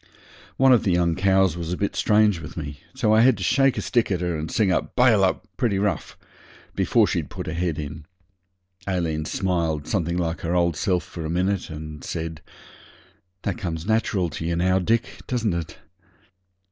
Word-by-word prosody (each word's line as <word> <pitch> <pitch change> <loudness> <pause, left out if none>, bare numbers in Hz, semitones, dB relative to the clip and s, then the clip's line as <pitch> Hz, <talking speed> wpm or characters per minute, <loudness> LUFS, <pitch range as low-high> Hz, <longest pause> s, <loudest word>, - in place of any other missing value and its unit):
One 135 0 +6
of 120 - +4
the 95 - +1
young 85 -1 +2
cows 95 -1 +3
was 85 -1 -4
a 90 - -2
bit 100 - -2
strange 105 -3 +3
with 85 - -9
me, 70 -3 -6 0.2
so 115 -5 +2
I 110 - +6
had 125 -2 +5
to 95 - -5
shake 135 +6 +3
a - - -2
stick 120 -3 +1
at 90 -3 -1
her 90 -1 -1
and 80 0 -4
sing 105 -4 +2
out - - -1
'Bail 120 -5 +5
up' 95 - +1
pretty 115 -7 +1
rough 100 0 -2 0.6
before - - +3
she'd - - -2
put - - -6
her 80 - -4
head 85 -2 -1
in. 75 0 -6 0.8
Aileen 80 -5 -1
smiled 85 -5 -1
something 85 -3 -1
like 85 -1 -2
her 85 +1 -1
old 85 -2 +2
self 90 +2 0
for 85 - -8
a 80 - -4
minute, 90 +3 0
and 75 -2 -8
said 80 -1 -5 1.0
'That - - -2
comes 85 -5 -4
natural 105 -4 +1
to 80 - -5
you 85 +1 -1
now, 95 +2 +2
Dick, 115 +5 +1 0.2
doesn't 115 -6 0
it?' 85 -2 -5
90 Hz, 195 wpm, -24 LUFS, 80-105 Hz, 1.0 s, One